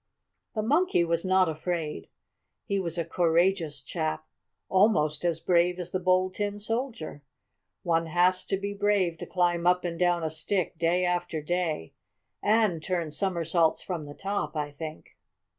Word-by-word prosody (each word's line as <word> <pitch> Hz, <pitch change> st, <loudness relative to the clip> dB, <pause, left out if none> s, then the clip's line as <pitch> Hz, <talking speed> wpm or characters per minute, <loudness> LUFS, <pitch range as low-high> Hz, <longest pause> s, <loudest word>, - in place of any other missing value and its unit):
The 215 Hz, -, 0 dB
Monkey 295 Hz, -, +3 dB
was 170 Hz, 0 st, 0 dB
not 185 Hz, -1 st, +3 dB
afraid. 160 Hz, 0 st, -3 dB, 0.6 s
He 200 Hz, -2 st, 0 dB
was 170 Hz, -2 st, -2 dB
a 170 Hz, -, -1 dB
courageous 170 Hz, -3 st, +1 dB
chap, 155 Hz, +1 st, -3 dB, 0.4 s
almost 155 Hz, -7 st, +3 dB
as 170 Hz, -2 st, +1 dB
brave 175 Hz, +1 st, +2 dB
as 180 Hz, -1 st, -4 dB
the 185 Hz, -, -1 dB
Bold 185 Hz, 0 st, +2 dB
Tin 205 Hz, +1 st, -2 dB
Soldier. 225 Hz, -, -3 dB, 0.6 s
One 165 Hz, -1 st, +1 dB
has 180 Hz, +2 st, +3 dB
to 195 Hz, -, -1 dB
be 200 Hz, +1 st, -4 dB
brave 200 Hz, -5 st, +1 dB
to -, -, -6 dB
climb 175 Hz, -1 st, +1 dB
up 180 Hz, 0 st, +3 dB
and 170 Hz, -1 st, -3 dB
down 175 Hz, -1 st, +2 dB
a 160 Hz, -, -1 dB
stick 170 Hz, +4 st, -1 dB
day 175 Hz, +2 st, +2 dB
after 175 Hz, -2 st, -1 dB
day, 160 Hz, -, -2 dB, 0.5 s
and 210 Hz, -6 st, +2 dB
turn 170 Hz, -2 st, -2 dB
somersaults 170 Hz, -2 st, +1 dB
from 170 Hz, -5 st, -4 dB
the 145 Hz, 0 st, -10 dB
top; 195 Hz, -6 st, -3 dB
I 150 Hz, -1 st, -2 dB
think. 155 Hz, +2 st, -9 dB
175 Hz, 160 wpm, -28 LUFS, 160-190 Hz, 0.6 s, Monkey